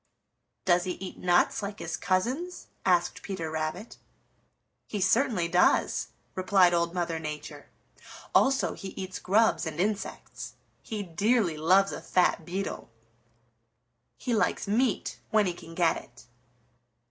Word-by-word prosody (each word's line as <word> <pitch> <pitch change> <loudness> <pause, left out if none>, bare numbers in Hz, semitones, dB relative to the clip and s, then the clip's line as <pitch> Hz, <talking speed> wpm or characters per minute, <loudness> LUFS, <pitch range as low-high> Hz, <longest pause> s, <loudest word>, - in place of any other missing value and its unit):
"Does 175 0 +3
he 185 - -1
eat 185 +1 -8
nuts 175 +3 +3
like 200 0 -5
his 165 -4 -4
cousins?" 255 - -1 0.2
asked 175 -2 +2
Peter 175 -5 -4
Rabbit. 160 +7 -4 0.9
"He 210 - -3
certainly 205 -2 +2
does," 180 +1 +3 0.3
replied 185 -1 +4
Old 170 0 +1
Mother 170 -2 -1
Nature. 150 -1 -7 0.6
"Also 270 0 +3
he 190 -1 -8
eats 185 -1 -5
grubs 215 -2 +2
and 160 0 -5
insects. 205 +2 -3 0.3
He 215 -3 -4
dearly 195 +1 +1
loves 185 +6 +4
a - - -6
fat 175 -3 +2
beetle. 190 +3 -4 1.3
He 245 - -2
likes 215 - +1
meat 225 +2 0
when 215 -1 +3
he 180 - 0
can 165 -1 -12
get 170 -2 +3
it." 120 - -13
185 Hz, 130 wpm, -28 LUFS, 170-210 Hz, 1.3 s, replied